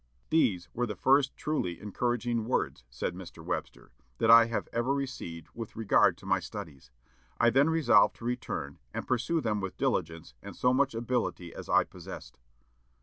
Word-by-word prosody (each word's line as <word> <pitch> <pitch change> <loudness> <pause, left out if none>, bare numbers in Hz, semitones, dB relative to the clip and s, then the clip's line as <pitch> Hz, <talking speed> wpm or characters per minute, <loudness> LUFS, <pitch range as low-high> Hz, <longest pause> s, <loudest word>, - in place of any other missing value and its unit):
"These 100 - +2
were 120 +1 -1
the 105 - -4
first 135 +7 +3
truly 90 - -2
encouraging 120 +2 -1
words," 110 - -1
said 60 +8 -3
Mr. 90 -1 -10
Webster, - - -5 0.3
"that 115 - +4
I 115 0 +9 0.3
ever 120 +4 +1
received 85 - -5
with 115 -2 -7
regard 110 -2 +3
to - - -15
my - - +2
studies. 70 -5 -9 0.5
I 120 - +5
then 135 +6 +4
resolved 160 -2 +4
to 115 - -11
return, 85 -11 -4 0.2
and - - -4
pursue 125 +7 0
them 105 -3 -1
with 95 -1 -5
diligence 80 0 -2
and 100 - -9
so 125 0 +2
much 135 -2 +2
ability 115 -7 -2
as - - -9
I - - +5
possessed." - - -11
115 Hz, 165 wpm, -30 LUFS, 90-125 Hz, 0.5 s, I